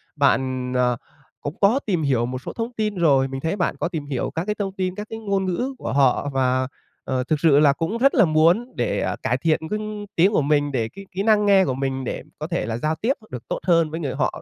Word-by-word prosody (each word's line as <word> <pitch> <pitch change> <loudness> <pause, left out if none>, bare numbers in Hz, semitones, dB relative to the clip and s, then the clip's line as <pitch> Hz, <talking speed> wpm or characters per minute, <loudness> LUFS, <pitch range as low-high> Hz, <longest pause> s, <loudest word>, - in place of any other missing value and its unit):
Bạn, 130 -3 +1
ờ, 125 -1 +2 0.4
cũng 145 +3 -5
có 210 +7 +4
tìm 180 -7 0
hiểu 130 -5 +2
một 125 +1 -5
số - - -7
thông 230 +1 -4
tin 215 -3 -2
rồi, 140 -7 +3
mình 135 0 -6
thấy 160 +5 -1
bạn 180 -4 -1
có - - 0
tìm 160 -5 -5
hiểu 140 -3 -3
các 165 +2 -2
cái 210 0 -1
thông 195 -2 -3
tin 185 -1 -2
các 210 +1 -6
cái 225 - -6
ngôn 200 -3 -1
ngữ 245 +9 -2
của - - -4
họ 140 +1 +3
và, 130 -1 +1 0.4
ờ, 130 -1 -1
thực 150 +3 0
sự 150 -3 +5
là 145 -2 +5
cũng 165 +10 -2
rất 275 +4 +4
là 225 - +6
muốn 170 +10 +3
để - - -1
cải - - +1
thiện 160 -2 +1
cái 210 - -1
ng 215 -1 -5
tiếng 185 +4 +4
của 200 - +2
mình 145 0 +1
để 115 -4 -1
cái 195 +11 -11
kỹ 190 +2 -2
năng 210 -1 +4
nghe 195 -2 +5
của 130 - -1
mình 135 0 -2
để - - -4 0.2
có 155 - -4
thể 170 -9 -2
là 115 0 -3
giao 155 +6 -1
tiếp 235 +10 0 0.2
được 125 - -7
tốt - - -2
hơn 165 -2 +3
với 160 - -4
người 140 -6 -3
họ, - - -1
160 Hz, 260 wpm, -23 LUFS, 135-200 Hz, 0.4 s, là